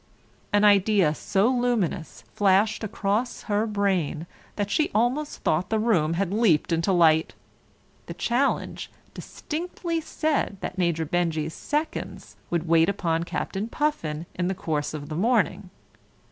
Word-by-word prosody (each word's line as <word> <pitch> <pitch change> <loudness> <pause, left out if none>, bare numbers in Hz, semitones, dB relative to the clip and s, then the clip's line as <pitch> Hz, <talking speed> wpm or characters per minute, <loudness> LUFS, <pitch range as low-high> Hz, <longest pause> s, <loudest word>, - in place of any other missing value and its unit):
An 205 0 +3
idea 200 -5 +4
so 195 +6 +1
luminous 240 -10 -1
flashed 205 +2 +2
across 215 +3 -2
her 210 +1 0
brain 190 -7 0 0.3
that 205 -1 -2
she 305 - +2
almost 255 +7 0
thought 170 +4 +1
the 220 - +1
room 190 -8 +2
had 195 +1 -1
leaped 205 -9 +2
into 165 +3 +1
light. 160 -3 +3 0.7
The - - -7
challenge 250 +4 -1 0.2
distinctly 335 +1 -4
said 310 -9 -1
that 190 - -5
Major 170 -2 +1
Benjy's 160 -1 -1
seconds 300 +2 -4
would 170 -1 -1
wait 165 +1 +4
upon 170 -4 -1
Captain 195 +4 -3
Puffin 170 - -2
in 175 0 -2
the 190 - -1
course 155 -4 -2
of 145 -1 -7
the 155 - -5
morning. 205 -1 +1
195 Hz, 135 wpm, -25 LUFS, 165-225 Hz, 0.7 s, idea